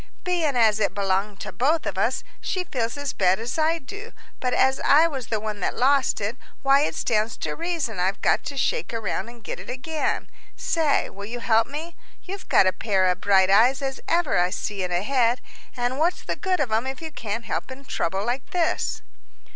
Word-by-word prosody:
"Bein' 340 -6 +1
as 220 -3 +4
it 200 -3 0
belonged 195 0 0
to - - -5
both 300 - +1
of - - -2
us, 225 +7 0 0.2
she 370 -1 -1
feels 240 -6 -3
as 285 -1 -3
bad 185 0 +3
as 240 +7 -3
I 320 +2 +3
do, 405 +7 -9 0.3
but 250 - 0
as 265 +1 +3
I 305 +3 +6
was 270 -8 -3
the 220 -1 -1
one 210 -1 -4
that - - -1
lost 275 +2 +3
it, 215 +4 -3 0.3
why 275 +1 +5
it 300 - 0
stands 220 0 0
to - - -3
reason 330 - -2
I've 190 +2 0
got - - +2
to 280 - -5
shake 465 - 0
around 225 +1 -2
and 235 -1 -14
get - - -5
it - - -10
again. 300 +5 -2 0.3
Say, 315 -4 +1
will 200 +1 -8
you 240 +2 -5
help 225 -1 +3
me? 320 +4 -6 0.3
You've 390 +1 -8
got - - +6
a 185 - +3
pair 195 -4 +1
of 180 - -4
bright 190 -1 +4
eyes 245 +7 +5
as 270 -1 -3
ever 335 - +2
I 180 0 +3
see 200 +1 -3
in 180 - -3
a 175 +2 0
head; 245 0 +2 0.4
and 245 +2 -1
what's 340 +3 +1
the - - -2
good 375 -2 0
of 265 -6 0
'em 225 +4 +1
if 265 0 -4
you 320 -1 -7
can't 230 -3 -4
help - - -3
in 270 +1 -10
trouble 190 -3 -1
like 245 +3 -2
this?" 345 -2 0
245 Hz, 220 wpm, -24 LUFS, 210-290 Hz, 0.4 s, I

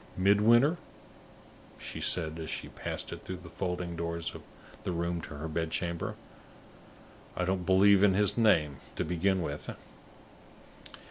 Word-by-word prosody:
"Midwinter?" 115 - +5 1.0
she - - -6
said, 80 -2 -1
as 80 - -5
she - - -4
passed - - -4
through 95 - -6
the 85 -2 -12
folding 90 -2 -3
doors 85 0 -3
of - - -9 0.4
the - - -2
room 85 0 -1
to 80 - -8
her 75 +3 -5
bed 80 +1 -2
chamber. 85 +1 -2 1.2
"I 90 - +1
don't 95 -1 -1
believe 95 +1 +6
in 100 -2 +5
his 105 0 +4
name, 80 - +3 0.2
to - - -1
begin 90 +2 +1
with!" 75 -1 -5
90 Hz, 140 wpm, -30 LUFS, 85-100 Hz, 1.2 s, believe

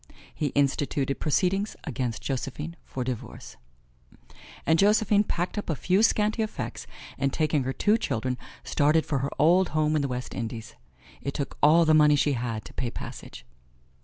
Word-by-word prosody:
He 150 - -1
instituted 140 0 0
proceedings 195 +6 0
against 125 -6 -3
Josephine 140 +5 -4
for 130 - -5
divorce. 125 -3 -6 1.1
And 160 0 +3
Josephine 210 0 +4
packed 180 +1 -2
up 205 - -6
a 160 - +1
few 185 +8 +2
scanty 215 0 +2
effects 215 - -4 0.3
and 135 0 +1
taking 150 -3 0
her 130 - -1
two 210 +10 +2
children 125 - -2 0.2
started 150 +2 +2
for 145 -4 -1
her 135 +2 -1
old 175 +5 +4
home 155 0 +2
in 150 - +2
the 140 - 0
West 125 -1 -5
Indies. 115 -1 -5 0.5
It 140 - -4
took 140 - -3
all 165 +3 +6
the 155 - +4
money 150 -1 +6
she 145 0 +2
had 115 -3 -3
to - - -11
pay 125 - -2
passage. 65 - -9
150 Hz, 165 wpm, -27 LUFS, 130-175 Hz, 1.1 s, all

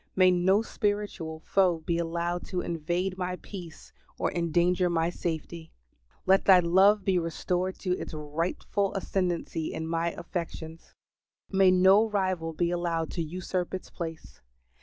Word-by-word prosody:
May 185 -1 +6
no 190 +4 +3
spiritual 205 -8 -2
foe 180 -4 +2
be 170 -1 0
allowed 170 +1 -2
to 180 -2 -2
invade 175 +3 -2
my 180 0 -2
peace 175 -4 -10 0.2
or - - 0
endanger 175 +1 +2
my 165 0 +1
safety. 165 -1 -5 0.5
Let 190 +1 +4
Thy 190 -2 +8
love 190 +4 +4
be 185 -2 +3
restored 180 +3 -2
to 185 - -2
its - - -6
rightful 165 +6 -2
ascendancy 180 -4 -2
in 160 - -4
my 165 +1 -1
affections. 165 -2 -7 0.6
May 190 -1 +5
no 190 +4 +5
rival 185 -5 -1
be 170 +2 0
allowed 170 -2 -1
to 170 - -3
usurp 180 +2 -3
its 185 - -8
place. 165 -2 -7
175 Hz, 140 wpm, -28 LUFS, 165-190 Hz, 0.6 s, Thy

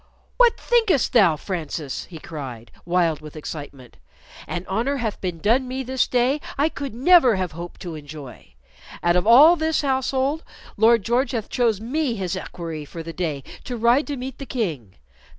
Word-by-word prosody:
"What 485 -2 +5
thinkest 450 - +2
thou, 195 -10 +5
Francis?" 155 -4 -5
he 170 - -10
cried, 135 -8 -8
wild 170 -3 +1
with 155 0 -11
excitement. 145 -4 -8 0.5
"An 175 0 -4
honor 235 +9 0
hath 225 -5 -3
been 180 -3 -3
done 235 +9 +2
me 260 +1 -3
this 260 0 0
day 255 +4 +1 0.2
I 295 +3 +3
could 275 -6 -6
never 265 - +6
have 185 -3 -2
hoped 170 +2 -9
to 175 -3 -6
enjoy. 145 - -10 0.5
Out 175 0 +3
of 180 +3 +1
all 290 +9 +8
this 320 -1 0
household, 265 +2 0 0.3
Lord 225 0 +4
George 245 +4 +1
hath 225 -3 -3
chose 230 -5 +1
me 255 +3 -1
his 190 -3 -3
equerry 165 -4 -6
for 165 +3 -8
the 165 0 -7
day 155 -6 -3 0.2
to 245 - -5
ride 235 +6 +3
to 290 -2 -3
meet 255 0 -7
the 275 - -7
King. 155 - -3
220 Hz, 175 wpm, -23 LUFS, 165-265 Hz, 0.5 s, all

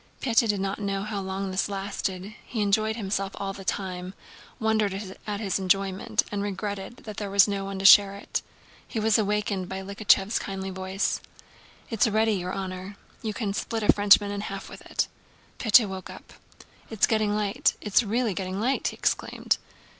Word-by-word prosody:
Pétya 230 -2 +2
did 205 -1 +1
not 195 +1 -2
know 195 -1 -1
how 210 -1 -3
long 190 0 -3
this 185 +2 0
lasted: 195 0 -4
he 230 - -5
enjoyed 215 +2 +2
himself 195 -2 -2
all 195 -1 -4
the 195 - -9
time, 185 -1 -3 0.4
wondered 210 -3 0
at 205 -1 -2
his 200 -3 -1
enjoyment 195 0 +1
and 205 -1 -2
regretted 205 +2 -4
that 215 -2 -8
there 205 -2 -3
was 200 +1 +6
no 200 -1 -2
one 195 0 -5
to 195 - -4
share 200 0 +8
it. 200 - -3 0.5
He 225 - -3
was 220 0 +3
awakened 205 -3 -1
by 190 0 -4
Likhachëv's 200 +1 +2
kindly 195 -1 -5
voice. 190 +1 -2 0.7
"It's 225 0 +3
ready, 220 0 +2
your 180 -2 -2
honor; 190 +1 -5 0.2
you 215 -2 -3
can 205 -4 -2
split 225 +2 -2
a - - +6
Frenchman 205 0 +5
in 205 0 -3
half 195 -1 -6
with - - -10
it!" - - 0 0.5
Pétya 220 -1 +6
woke 190 -1 -7
up. - - -12 0.6
"It's 220 -3 +3
getting 215 -2 +1
light, 210 +6 +1
it's 210 +2 +3
really 230 0 0
getting 190 0 -3
light!" 255 +5 +1
he - - -3
exclaimed. - - 0
200 Hz, 180 wpm, -26 LUFS, 195-215 Hz, 0.7 s, share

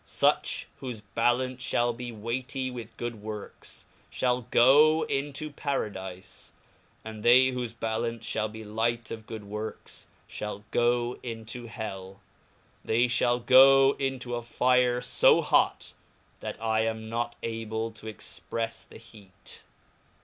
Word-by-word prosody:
Such - - +1 0.2
wliofe 120 -5 -6
ballance 125 +2 0
(hall 120 0 +2
be 120 +1 -6
weightie 125 +4 -3
with 115 -2 -8
good 120 -3 -5
works, 105 -1 -7 0.3
(hall 125 -1 +1
goe 150 +7 +6
into 145 +2 -2
Paradife; 95 -10 -5 0.6
and 110 -1 -7
they 130 +3 +6
whofe 120 -2 -4
ballance 115 +1 -2
(hall 110 0 0
be 110 +1 -9
light 115 +2 -1
of 110 -1 -7
fSod 110 -2 -7
works, 105 +2 -6 0.3
(hall 105 -1 -5
goe 120 0 +1
into 115 0 -6
hell, 95 -4 -7 0.6
they 115 +2 +3
(hall 120 0 +2
goe 135 +2 +7
into 130 -2 -2
a 120 - -2
fire 125 +1 +2
fo 125 - +4
hot, - - +2 0.5
that - - -6
I 110 0 +1
am 110 0 -3
not 120 +1 -2
able 115 0 -3
to 110 0 -8
expreffe 115 +2 -5
the - - -12
heat. 105 -4 -12
115 Hz, 130 wpm, -28 LUFS, 110-125 Hz, 0.6 s, goe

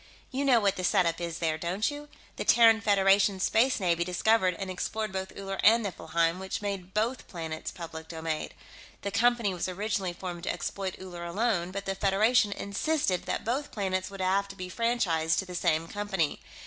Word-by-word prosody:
You 270 +2 -1
know 255 -4 +5
what 200 -3 +1
the 185 - -3
setup 170 -2 +2
is, 170 -1 -3
there, 160 -2 -1
don't 185 - -1
you? 295 0 -8 0.3
The - - -2
Terran 225 -1 +6
Federation 195 -1 +4
Space 235 +7 +3
Navy 170 -3 +1
discovered 185 +1 +2
and 190 -1 -4
explored 215 +3 -3
both 190 0 -4
Uller 195 -1 -5
and 230 +2 +6
Niflheim, 170 -2 0
which 190 0 -4
made 195 -2 -5
both 230 +4 -1
planets 160 -3 -5
public 160 -2 -8
domain. 160 -1 -3 0.5
The 200 - -2
Company 230 -1 +2
was 180 - -2
originally 195 -1 -2
formed 175 -1 -6
to - - 0
exploit 190 -2 -4
Uller 175 -2 -8
alone, 180 0 0
but 195 +1 -5
the 195 - -1
Federation 205 +3 +3
insisted 200 - -1
that - - -2
both 265 +6 -1
planets 190 -2 -2
would 195 -1 -7
have 195 +2 +1
to 195 - -10
be 185 -1 -7
franchised 190 -10 +1
to 190 - 0
the 180 - -9
same 165 -2 +1
company. 195 -5 -1
195 Hz, 185 wpm, -29 LUFS, 175-215 Hz, 0.5 s, Terran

